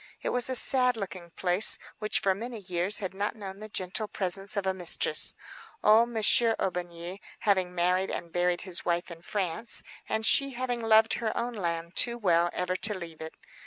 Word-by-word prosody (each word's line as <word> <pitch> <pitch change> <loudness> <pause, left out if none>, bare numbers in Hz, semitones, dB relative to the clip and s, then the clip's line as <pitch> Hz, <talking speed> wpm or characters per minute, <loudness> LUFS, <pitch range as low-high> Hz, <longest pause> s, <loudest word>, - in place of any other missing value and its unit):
It - - -1
was 245 +1 0
a 260 - -2
sad 250 -1 +4
looking 185 -4 -7
place, 180 +4 +3 0.2
which 215 0 +2
for 195 - +2
many 230 +4 -7
years 185 0 +2
had 190 -3 -2
not 205 +3 -3
known 195 -2 -9
the 215 0 -10
gentle 185 +2 -2
presence 195 +1 -3
of 200 - -2
a 190 - 0
mistress, 180 -2 +2 0.5
old 225 +3 +5
Monsieur 225 0 +3
Aubigny 175 0 -5 0.2
having 185 -3 0
married 180 +2 0
and 170 - -6
buried 175 0 0
his 185 -2 -1
wife 175 0 -2
in 165 -1 -11
France, 195 +4 -2 0.3
and 220 0 -1
she 275 +2 +4
having 245 -1 -3
loved 220 0 +4
her 225 -2 -3
own 240 +1 -3
land 170 -3 -4
too 240 -1 +4
well 175 -5 +2
ever 180 0 -3
to 210 +1 +3
leave 165 -3 -10
it. 160 0 -8
195 Hz, 190 wpm, -27 LUFS, 175-220 Hz, 0.5 s, old